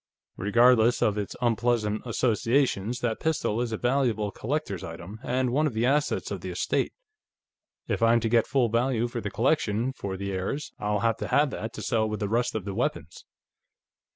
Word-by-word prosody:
Regardless 120 +3 +4
of 105 - +2
its 105 -2 -4
unpleasant 115 -2 +1
associations, 120 -1 +1
that 115 -2 -1
pistol 140 -8 0
is 120 -2 -2
a 110 - -2
valuable 120 -5 +1
collector's 120 - -3
item, 85 +6 -8
and 125 0 0
one 150 +4 +2
of 130 - -5
the 115 +2 +1
assets 145 +3 +1
of - - -4
the - - -5
estate. - - -1 1.0
If - - -1
I'm 115 +1 +5
to 115 - 0
get 115 0 +3
full 135 -4 +2
value 120 +1 +1
for 120 0 -5
the 100 - -3
collection, 120 0 +1
for 100 -7 -5
the 100 +1 -4
heirs, 95 +11 -3
I'll 105 -1 0
have 115 -1 +1
to - - -4
have 145 -1 +3
that, 110 -2 -5
to - - -7
sell 110 -3 +1
with 105 - -3
the 105 - -1
rest 120 +2 0
of 105 -4 -3
the 100 - -4
weapons." 85 -8 -3
115 Hz, 190 wpm, -27 LUFS, 105-125 Hz, 1.0 s, I'm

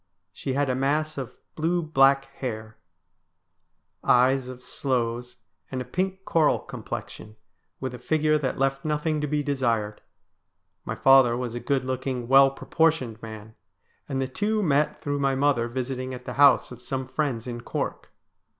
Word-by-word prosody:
She 135 +6 -4
had 140 +1 +1
a 130 - +1
mass 150 +4 0
of 130 -4 -7 0.2
blue 170 +2 0
black 135 -3 +4
hair, 110 -5 -6 1.3
eyes 130 +1 +4
of 125 0 -9
sloes, 125 -2 -2 0.3
and 130 - -4
a 125 - -4
pink 190 +7 -3
coral 160 -3 +3
complexion, 105 0 -8 0.4
with 130 -1 -4
a 125 - -8
figure 155 +3 +2
that 135 -3 -2
left 135 0 0
nothing 150 0 -1
to 150 - -1
be 150 0 0
desired. 115 -7 -1 0.8
My - - -3
father 135 -3 +5
was 125 -2 -3
a 120 - -3
good 135 0 -1
looking, 130 -1 -3
well 135 +1 +7
proportioned 135 -5 0
man, 110 -1 -9 0.6
and 135 -2 -1
the 135 - 0
two 210 +9 -1
met 150 -3 +2
through 145 0 -2
my 135 -1 +1
mother 135 -4 +2
visiting 130 +1 -4
at 125 0 -11
the - - -5
house 140 -2 +5
of 125 -1 -10
some 130 +1 -3
friends 130 -4 -2
in 120 -1 -5
Cork. - - -4
135 Hz, 160 wpm, -26 LUFS, 125-145 Hz, 1.3 s, well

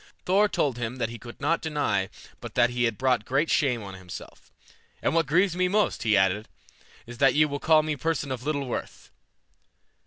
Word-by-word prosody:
Thor 200 +3 +3
told 135 - 0
him 115 +1 -3
that 115 -3 -2
he 115 0 -8
could 120 -1 -11
not 160 +4 +1
deny 145 - -1 0.3
but - - -9
that 120 0 +4
he 120 0 +1
had 115 -3 -1
brought 125 -2 +1
great 140 +7 0
shame 125 -6 +1
on 95 -1 -8
himself. 95 -1 -11 0.5
"And - - 0
what 165 -1 +2
grieves 175 +3 +2
me 180 0 +2
most," 210 +3 +1
he 110 -3 +3
added, 95 +2 +1 0.6
"is 120 +1 -11
that 135 -1 +4
ye 155 +1 +5
will 145 -1 -4
call 155 0 +4
me 155 0 -1
a - - -6
person 150 -1 -1
of 130 -2 -3
little 140 0 -2
worth." 125 - -6
135 Hz, 210 wpm, -26 LUFS, 115-155 Hz, 0.6 s, ye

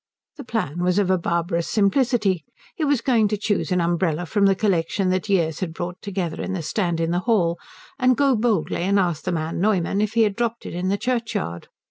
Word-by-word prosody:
The - - -7
plan 175 -7 -3
was 180 +1 +2
of 195 -2 +2
a 185 - +3
barbarous 170 0 -1
simplicity: 210 - +2 0.3
he 320 - -4
was 285 -5 +2
going 230 -4 +3
to 210 +1 -1
choose 205 -1 -1
an 180 - +2
umbrella 170 -1 0
from 200 +3 +2
the 195 - +3
collection 190 -1 0
that 185 +2 -1
years 165 -5 +1
had 165 -3 -4
brought 175 +1 -5
together 185 -5 -3
in 195 - -3
the 175 -3 -3
stand 170 0 -1
in 165 0 0
the 175 - +1
hall, 170 -6 +2 0.4
and 255 -2 +3
go 275 -2 +3
boldly 215 -7 0
and 195 +3 +2
ask 175 -5 0
the 185 - 0
man 165 0 -2
Neumann 195 -1 +1
if 215 0 -1
he 230 -1 +4
had 205 -2 0
dropped 235 -1 -2
it - - -6
in 180 +2 -2
the 200 - +1
churchyard. 215 - -2
190 Hz, 220 wpm, -23 LUFS, 170-215 Hz, 0.4 s, he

